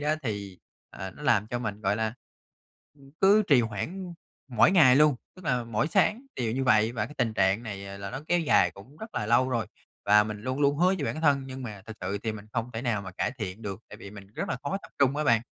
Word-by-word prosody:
đó 150 Hz, +1 st, +1 dB
thì, 100 Hz, -6 st, -4 dB, 0.3 s
ờ, 95 Hz, 0 st, -7 dB
nó 150 Hz, -, -13 dB
làm 110 Hz, -8 st, +3 dB
cho 120 Hz, -, -3 dB
mình, 105 Hz, -3 st, -4 dB
gọi 100 Hz, 0 st, +1 dB
là, 110 Hz, +1 st, -1 dB, 0.8 s
ừm, 135 Hz, 0 st, -17 dB
cứ 205 Hz, +2 st, +6 dB
trì 135 Hz, -4 st, +6 dB
hoãn 170 Hz, -, -4 dB, 0.3 s
mỗi 125 Hz, +5 st, +4 dB
ngày 145 Hz, -9 st, +6 dB
luôn, 150 Hz, -2 st, +5 dB, 0.2 s
tức 185 Hz, -, -13 dB
là 125 Hz, -5 st, 0 dB
mỗi 115 Hz, +4 st, 0 dB
sáng 210 Hz, +7 st, +2 dB
đều 115 Hz, -3 st, -1 dB
như 135 Hz, +2 st, -1 dB
vậy. 110 Hz, -1 st, +4 dB
Và 110 Hz, -2 st, -2 dB
cái 150 Hz, -, -12 dB
tình 115 Hz, -2 st, 0 dB
trạng 95 Hz, +2 st, +2 dB
này, 100 Hz, -4 st, -6 dB
ờ, 100 Hz, 0 st, -7 dB
là 100 Hz, 0 st, -6 dB
nó 135 Hz, -, -5 dB
kéo 175 Hz, 0 st, +3 dB
dài 100 Hz, -, +4 dB
cũng 100 Hz, +11 st, -15 dB
rất 220 Hz, +5 st, -10 dB
là 105 Hz, -, -2 dB
lâu 120 Hz, +3 st, +3 dB
rồi, 120 Hz, -5 st, -1 dB, 0.4 s
và 105 Hz, +1 st, +6 dB
mình 105 Hz, -1 st, -5 dB
luôn 130 Hz, +3 st, -3 dB
luôn 140 Hz, 0 st, +3 dB
hứa 180 Hz, -, +4 dB
với 145 Hz, -, -2 dB
bản 155 Hz, -, -3 dB
thân 145 Hz, -3 st, +3 dB
nhưng 130 Hz, 0 st, -7 dB
mà 105 Hz, -5 st, -7 dB
thực 110 Hz, -, -8 dB
sự 95 Hz, +2 st, -2 dB
thì 110 Hz, -, -1 dB
mình 105 Hz, -1 st, -9 dB
không 120 Hz, 0 st, -2 dB
thể 115 Hz, -, -4 dB
nào 115 Hz, -5 st, 0 dB
mà 95 Hz, -, -7 dB
cải 110 Hz, -, -2 dB
thiện 105 Hz, 0 st, -5 dB
được, 100 Hz, -2 st, -5 dB
tại -, -, -10 dB
vì 100 Hz, -3 st, -10 dB
mình 100 Hz, -2 st, -11 dB
rất -, -, -3 dB
là -, -, -1 dB
khó 145 Hz, +7 st, -2 dB
tập -, -, -14 dB
trung 140 Hz, 0 st, +3 dB
á 150 Hz, -, 0 dB
bạn. 115 Hz, -3 st, +4 dB
115 Hz, 265 wpm, -27 LUFS, 105-140 Hz, 0.8 s, cứ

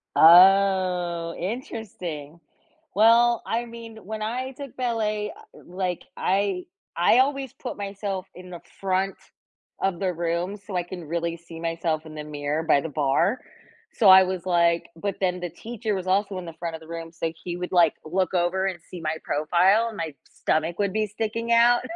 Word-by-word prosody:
Oh, 180 Hz, -1 st, +5 dB
interesting. 180 Hz, -, -6 dB, 0.6 s
Well, 230 Hz, +2 st, +5 dB
I 235 Hz, +1 st, -1 dB
mean, 230 Hz, -1 st, -10 dB
when 215 Hz, +1 st, -5 dB
I 250 Hz, +4 st, -3 dB
took 270 Hz, -1 st, -9 dB
ballet, 215 Hz, -3 st, -1 dB
uh, 435 Hz, +4 st, -17 dB
like, 180 Hz, -1 st, -3 dB
I 200 Hz, -, 0 dB, 0.3 s
I 240 Hz, -, +4 dB
always 270 Hz, -1 st, +1 dB
put -, -, -7 dB
myself 195 Hz, -1 st, -4 dB
in 180 Hz, 0 st, -11 dB
the 175 Hz, -, -8 dB, 0.2 s
front 190 Hz, 0 st, 0 dB, 0.7 s
of 195 Hz, -3 st, 0 dB
the 185 Hz, -2 st, 0 dB
room 170 Hz, +4 st, -2 dB
so 200 Hz, -1 st, -9 dB
I 180 Hz, -, +1 dB
can 175 Hz, -1 st, -8 dB
really 170 Hz, +1 st, -2 dB
see 165 Hz, 0 st, -11 dB
myself 165 Hz, -1 st, -2 dB
in 155 Hz, -, -10 dB
the 150 Hz, -, -5 dB
mirror 150 Hz, +1 st, -2 dB
by 140 Hz, -3 st, +3 dB
the 160 Hz, -, -5 dB
bar. 145 Hz, -, +1 dB, 0.6 s
So, 210 Hz, -5 st, +5 dB
I 190 Hz, 0 st, +10 dB
was, 185 Hz, -1 st, -3 dB
like 170 Hz, -1 st, +2 dB
but, 200 Hz, +4 st, -3 dB
then 180 Hz, -1 st, +1 dB
the 175 Hz, -1 st, -4 dB
teacher 220 Hz, +4 st, -4 dB
was 185 Hz, -1 st, -4 dB
also 195 Hz, 0 st, +1 dB
in 175 Hz, -, -8 dB
the 165 Hz, -, -8 dB
front 165 Hz, 0 st, -5 dB
of 160 Hz, -, -10 dB
the 160 Hz, -, -14 dB
room, 165 Hz, 0 st, -7 dB
so 165 Hz, -1 st, -3 dB
he 175 Hz, -1 st, -4 dB
would, 180 Hz, +1 st, -5 dB
like, 170 Hz, -4 st, +5 dB
look 185 Hz, +2 st, -1 dB
over 180 Hz, +2 st, +1 dB
and 185 Hz, -3 st, -2 dB
see 180 Hz, -, -8 dB
my 160 Hz, 0 st, -2 dB
profile 180 Hz, +9 st, +3 dB
and 220 Hz, -, -10 dB
my 160 Hz, -2 st, -4 dB, 0.2 s
stomach 160 Hz, +2 st, -1 dB
would 200 Hz, -1 st, 0 dB
be 215 Hz, 0 st, 0 dB
sticking 225 Hz, +2 st, -3 dB
out. 235 Hz, +1 st, +5 dB
185 Hz, 185 wpm, -25 LUFS, 170-215 Hz, 0.7 s, I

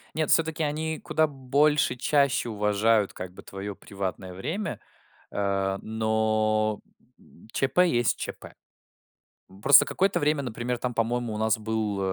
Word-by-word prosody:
Нет, 155 Hz, -1 st, 0 dB
всё-таки 160 Hz, -1 st, +2 dB
они 155 Hz, +1 st, -2 dB
куда 155 Hz, 0 st, +1 dB
больше, 145 Hz, +1 st, +2 dB
чаще 140 Hz, -1 st, +1 dB
уважают, 105 Hz, 0 st, +2 dB
как 90 Hz, 0 st, -7 dB
бы, -, -, -11 dB
твоё 100 Hz, +1 st, -7 dB
приватное 95 Hz, -2 st, -6 dB
время. 155 Hz, -, -4 dB, 0.5 s
Э, 100 Hz, -1 st, -1 dB
но 110 Hz, -1 st, 0 dB, 0.7 s
ЧП 180 Hz, +7 st, +3 dB
есть 120 Hz, -6 st, +1 dB
ЧП. -, -, -7 dB, 1.1 s
Просто 140 Hz, -, +8 dB
какое-то 190 Hz, -2 st, +1 dB
время, 150 Hz, -1 st, +1 dB
например, 120 Hz, 0 st, -3 dB
там, 125 Hz, 0 st, -3 dB
по-моему, 115 Hz, 0 st, -1 dB
у 105 Hz, -, -4 dB
нас 110 Hz, 0 st, +1 dB
был, 110 Hz, -2 st, -2 dB
115 Hz, 130 wpm, -26 LUFS, 105-145 Hz, 1.1 s, Просто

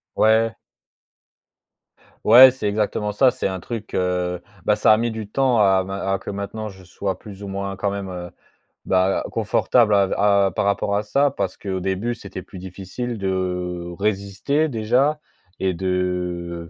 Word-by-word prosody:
Ouais. 110 Hz, +1 st, +3 dB, 1.7 s
Ouais, 125 Hz, +3 st, +9 dB
c'est 110 Hz, -6 st, -3 dB
exactement 105 Hz, 0 st, -1 dB
ça, 125 Hz, +5 st, +3 dB
c'est -, -, -2 dB
un 95 Hz, -1 st, -4 dB
truc, 110 Hz, +2 st, -7 dB
heu, 90 Hz, -1 st, -1 dB, 0.2 s
bah 105 Hz, -, +3 dB
ça 105 Hz, -, +5 dB
a -, -, +6 dB
mis 115 Hz, +1 st, -1 dB
du 110 Hz, -2 st, -6 dB
temps 130 Hz, 0 st, +2 dB
à 95 Hz, -2 st, +4 dB
ma 95 Hz, +1 st, -3 dB
à 95 Hz, -, +1 dB
que -, -, -6 dB
maintenant, 100 Hz, +2 st, -5 dB
je 95 Hz, -2 st, -13 dB
sois 95 Hz, +1 st, -4 dB
plus 100 Hz, -1 st, -11 dB
ou 100 Hz, -, -6 dB
moins, 100 Hz, 0 st, -4 dB
quand 100 Hz, +1 st, -1 dB
même, 100 Hz, -1 st, -4 dB
heu, 90 Hz, -1 st, -7 dB, 0.6 s
bah, 95 Hz, +1 st, +2 dB
confortable 115 Hz, -4 st, +2 dB
à 100 Hz, -1 st, +4 dB
v -, -, -2 dB
à 100 Hz, -1 st, +3 dB
par -, -, 0 dB
rapport 100 Hz, 0 st, 0 dB
à 105 Hz, -, 0 dB
ça. 140 Hz, +7 st, +2 dB
Parce 95 Hz, -8 st, -3 dB
qu'au 95 Hz, -2 st, -4 dB
début, 95 Hz, +6 st, -2 dB
c'était 100 Hz, -4 st, -8 dB
plus 95 Hz, -, -12 dB
difficile 95 Hz, +6 st, -6 dB
de 90 Hz, -2 st, -2 dB
résister 105 Hz, +9 st, 0 dB
déjà, 125 Hz, +5 st, +1 dB, 0.4 s
et 95 Hz, -1 st, 0 dB
de 90 Hz, -2 st, -2 dB
100 Hz, 170 wpm, -22 LUFS, 95-110 Hz, 1.7 s, Ouais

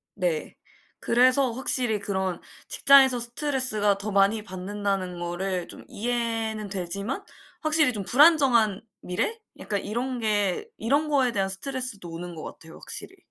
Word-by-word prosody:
네. 175 Hz, -5 st, -2 dB, 0.5 s
그래서 255 Hz, +2 st, +4 dB
확실히 245 Hz, -2 st, 0 dB
그런 190 Hz, -3 st, -2 dB, 0.3 s
직장에서 270 Hz, -2 st, +6 dB
스트레스가 240 Hz, -5 st, 0 dB
더 205 Hz, +1 st, -4 dB
많이 200 Hz, +2 st, +3 dB
받는다는 190 Hz, -2 st, -3 dB
거를 175 Hz, +1 st, -3 dB
좀 -, -, -11 dB
이해는 225 Hz, -2 st, -2 dB
되지만 200 Hz, -, -4 dB, 0.4 s
확실히 310 Hz, -3 st, +3 dB
좀 205 Hz, -4 st, -4 dB
불안정한 255 Hz, -, +5 dB, 0.2 s
미래 180 Hz, -, -2 dB, 0.2 s
약간 205 Hz, -2 st, -2 dB
이런 245 Hz, +4 st, -3 dB
게 210 Hz, -, 0 dB
이런 285 Hz, +7 st, +1 dB
거에 270 Hz, -4 st, +2 dB
대한 195 Hz, -3 st, 0 dB
스트레스도 235 Hz, -1 st, -4 dB
오는 175 Hz, +1 st, -7 dB
것 155 Hz, -, -7 dB
같아요 160 Hz, 0 st, -10 dB
확실히. -, -, -8 dB
215 Hz, 310 characters per minute, -26 LUFS, 195-255 Hz, 0.5 s, 직장에서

